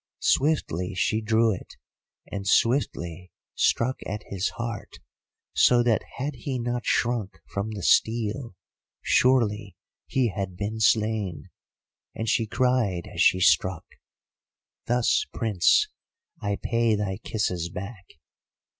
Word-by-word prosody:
Swiftly 100 - +1
she 110 +3 +1
drew 110 0 +3
it, 90 - -9 0.5
and 100 -1 -6
swiftly 90 - +1 0.2
struck 130 +3 +1
at 105 +1 -4
his 95 0 -1
heart, 115 -3 -5 0.6
so 120 +11 +5
that 115 -3 +2 0.2
had 145 +3 -2
he 135 -2 -3
not 120 0 -3
shrunk 115 -8 0
from 100 +2 -2
the 105 -4 -6
steel 115 0 +1 0.5
surely 110 -6 +2 0.3
he 130 -3 +1
had 95 -3 -5
been 105 +3 -3
slain; 105 -8 +1 0.6
and 110 - -4
she 110 +1 +1
cried 115 -8 +1
as - - -1
she 95 - +5
struck, 90 0 +3 1.0
'Thus, 120 0 +2
Prince, 105 -6 +3 0.5
I 100 -1 -1
pay 115 -2 +1
thy 100 -2 -2
kisses 90 -8 -2
back. 95 +1 -8
110 Hz, 120 wpm, -26 LUFS, 95-120 Hz, 1.0 s, so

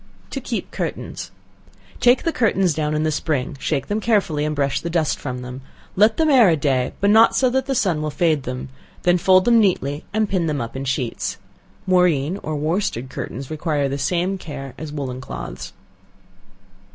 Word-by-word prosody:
To - - -4
Keep - - -4
Curtains. - - -5 0.7
Take 245 +1 +4
the 330 - +1
curtains 195 -7 +2
down 150 0 -1
in 155 - 0
the 155 - +1
spring, 150 -3 -1
shake 140 -2 -1
them 205 +1 -1
carefully 195 -10 +1
and 150 0 -1
brush 140 -1 0
the 170 - -4
dust 165 -3 0
from 125 -2 -5
them; 125 +1 -7 0.3
let 215 +3 +4
them 320 - +3
air 255 -9 +6
a 165 - +4
day, 135 -3 0
but 200 +1 +3
not 225 +2 +6
so 255 -2 +3
that 265 +1 0
the 270 - 0
sun 180 -9 +1
will 155 - -1
fade 155 -1 +1
them; 125 +1 -5 0.3
then 175 0 +3
fold 185 +2 +5
them 235 -1 +5
neatly, 150 -8 +1
and 215 0 +1
pin 185 -4 0
them 150 -2 -1
up 115 0 -5
in 135 +1 -4
sheets. 130 -2 -2 0.5
Moreen 180 -3 +2
or 155 0 -3
worsted 150 - -1
curtains 135 +4 -6
require 150 -2 0
the 140 +1 -3
same 180 +6 0
care 135 -6 -7
as 155 -2 -7
woollen 130 -4 -4
cloths. - - -7
155 Hz, 190 wpm, -21 LUFS, 140-195 Hz, 0.7 s, air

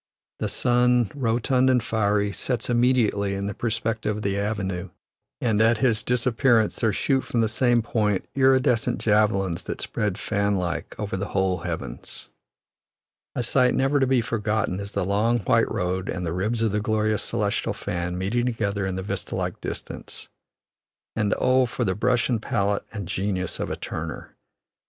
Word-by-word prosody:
The - - -1
sun, 125 -2 +2
rotund 125 0 +2
and 125 -3 +3
fiery, 105 -3 +1
sets 125 +1 -2
immediately 120 -5 +2
in 100 0 -3
the 100 - -3
perspective 110 -1 -2
of 105 - -6
the 100 -1 0
avenue; 95 -3 -2 0.5
and 110 -3 +1
at 115 0 +4
his 115 -3 +2
disappearance 120 -2 +2
there 110 - +2
shoot 135 +6 +1
from 120 - 0
the 110 - +3
same 120 +1 +2
point 105 -4 0
iridescent 130 -3 +3
javelins 105 -5 +2
that - - -4
spread, 105 -3 -2
fan 100 -1 0
like, 85 -2 -3
over 105 -3 -3
the 100 +2 -3
whole 95 -2 0
heavens. 80 -8 -6 1.1
A 125 - -1
sight 125 +1 +3
never 135 +2 +2
to 135 - +2
be 130 -2 +3
forgotten 110 -4 -1
is 100 +1 -6
the - - 0
long 105 +5 +2
white - - +2
road 90 +1 -2
and 90 -1 -3
the 85 - -2
ribs 110 +6 0
of 110 - +2
the 105 +1 0
glorious 110 0 +1
celestial 100 -1 -1
fan 90 0 -3
meeting 115 +7 0
together 100 -4 -1
in 95 - -3
the 95 - -3
vista 100 - -4
like - - -3
distance; - - -6 0.9
and 105 -2 +1
oh, 130 0 +3
for 120 0 -2
the 95 - +1
brush 120 +5 +1
and 115 -4 0
palette 100 -2 0
and 100 -5 -5
genius 95 -1 -2
of - - -2
a - - -2
Turner! - - -6
110 Hz, 170 wpm, -25 LUFS, 100-120 Hz, 1.1 s, at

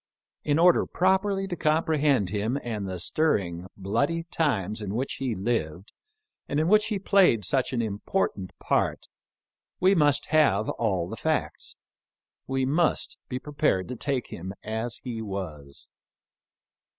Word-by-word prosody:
In 145 0 +1
order 175 +2 +5
properly 195 +1 +1
to 180 - -3
comprehend 155 - +2
him 110 +5 -1
and 105 -5 -4
the 90 -1 -4
stir 155 - +2
ring, 90 -2 -4
bloody 140 - 0
times 110 - 0
in 105 0 -4
which 130 +3 -2
he 130 -4 -1
lived, 95 -4 -2 0.6
and 145 - 0
in 160 - +1
which 210 +3 +4
he 215 - -1
played 185 - +4
such 130 -2 +2
an 120 -3 0
important 105 - -2
part, - - 0 0.7
we 185 +2 +5
must 150 -6 +3
have 140 -10 +3
all 95 -7 -1
the - - -7
facts - - -2 0.3
— - - -67 0.3
we 135 0 0
must 155 +5 +1
be 125 - -2
prepared 140 - 0
to 125 - -4
take 135 0 -2
him 95 +3 -7
as 110 +2 -3
he 120 -3 -4
was. 85 -9 -6
125 Hz, 150 wpm, -26 LUFS, 100-155 Hz, 0.7 s, order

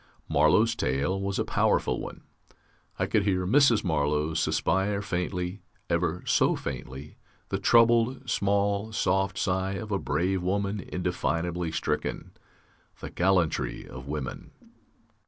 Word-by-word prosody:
Marlow's 80 +10 +4
tale 70 - -1
was 100 0 -2
a - - 0
powerful - - +1
one: - - -8 0.7
I - - +1
could 110 - +2
hear 95 -2 0
Mrs. 120 +2 +4
Marlow 75 -2 0
suspire 95 +6 +1
faintly, 90 0 -3 0.3
ever 85 0 0
so - - +3
faintly 70 - -7 0.3
the 95 - -1
troubled, 120 +4 +3
small, 100 0 0
soft 95 -2 0
sigh 95 0 0
of 105 +2 -6
a 100 - +1
brave 90 +5 0
woman 100 +3 -1
indefinably 85 -2 -2
stricken. - - -3 0.7
The - - -7
gallantry 90 -3 0
of 65 +1 -10
women! 75 -2 -5
95 Hz, 120 wpm, -27 LUFS, 80-100 Hz, 0.7 s, Marlow's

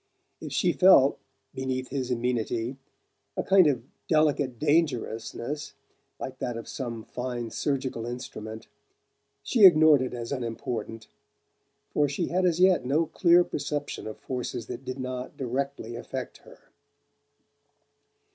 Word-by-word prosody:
If - - -6
she - - +2
felt, - - +6 0.3
beneath 130 -1 -3
his 130 -3 -3
amenity, 120 0 -1 0.6
a - - 0
kind 190 -4 +6
of 130 -5 +1 0.2
delicate 145 -5 +2
dangerousness, 145 -1 -1 0.5
like 130 0 -6
that 120 -2 -3
of 115 - -7
some 115 -4 -5
fine 120 -2 -5
surgical 130 -5 -2
instrument, 110 -3 -7 0.8
she 230 -5 +2
ignored 155 -6 +8
it 130 -1 -3
as 115 -1 -6
unimportant; 115 -3 -4 0.9
for 145 -1 +2
she 155 +5 -2
had 185 +1 +2
as 170 -1 +1
yet 185 -5 +5
no 145 +6 +2
clear 175 +1 +4
perception 145 -6 -4
of 110 - -7
forces 125 -2 -4
that 125 - -7
did 130 +1 -5
not 130 0 -5
directly 130 -2 -3
affect - - -6
her. - - -19
130 Hz, 130 wpm, -27 LUFS, 120-150 Hz, 0.9 s, ignored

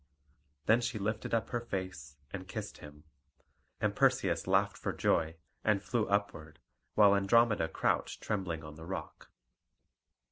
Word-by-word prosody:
Then 115 +3 +5
she 115 -1 -2
lifted 105 +2 -2
up 115 -3 0
her 120 - -1
face, 95 - -5 0.2
and 95 -2 -6
kissed 105 +1 -6
him; 75 0 -12 0.8
and - - 0
Perseus - - +2
laughed - - +3
for - - -3
joy, 80 0 +1 0.3
and 105 -2 +2
flew 115 -3 0
upward, 95 -6 -1 0.4
while 100 -2 +7
Andromeda 100 -2 +4
crouched - - 0
trembling 90 -6 -2
on 75 0 -8
the 80 - -9
rock. 85 -4 -6
100 Hz, 140 wpm, -32 LUFS, 80-110 Hz, 0.8 s, while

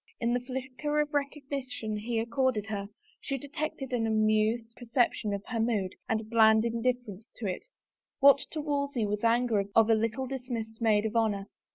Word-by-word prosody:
In 235 0 +1
the 245 - +2
flicker 265 +4 -3
of 295 0 0
rec 285 -1 0
ognition 260 -6 -4
he 230 +2 -2
accorded 235 -1 0
her, 205 -2 -4 0.3
she 275 - -3
detected 285 -1 -5
an 225 -2 +1
amused 220 +1 +1
per 245 - -11
ception 230 -3 +1
of 200 - -6
her 235 -2 -2
mood 215 -5 0 0.2
and 220 -1 -1
bland 220 -1 +5
indifference 235 -2 -2
to 230 - -6
it 185 - -3 0.3
— - - -64
what 280 0 +7
to 310 - -4
Wolsey 280 -5 -1
was 210 0 -1
the 230 - +2
anger 230 -3 +2
of 225 0 +6
a - - +7
little 225 +4 0
dismissed 240 -4 -5
maid 215 -2 +3
of 220 +1 -2
honor? 210 -4 +1
230 Hz, 190 wpm, -29 LUFS, 220-260 Hz, 0.3 s, what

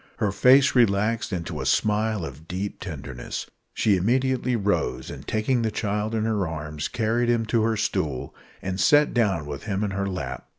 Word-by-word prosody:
Her 105 -5 0
face 130 +7 +5
relaxed 115 -1 +2
into 85 -3 -4
a - - -4
smile 105 -3 +1
of 75 +3 -10
deep 95 +3 -4
tenderness. 70 -9 -6 0.3
She 100 -3 +2
immediately 125 +5 +1
rose, 105 -2 -1
and - - -10
taking 115 +3 +1
the 110 - +1
child 105 +1 -2
in 110 - 0
her 105 -5 0
arms 75 -2 -4
carried 120 +1 0
him 115 -1 +2
to 115 +1 +1
her 110 0 +1
stool, 65 -10 -2 0.3
and 95 0 -3
sat 145 0 +4
down 100 - +1
with 75 +2 -7
him 100 -1 -1
in 105 - -1
her 100 0 -2
lap. 65 -9 -5
105 Hz, 180 wpm, -25 LUFS, 90-115 Hz, 0.3 s, face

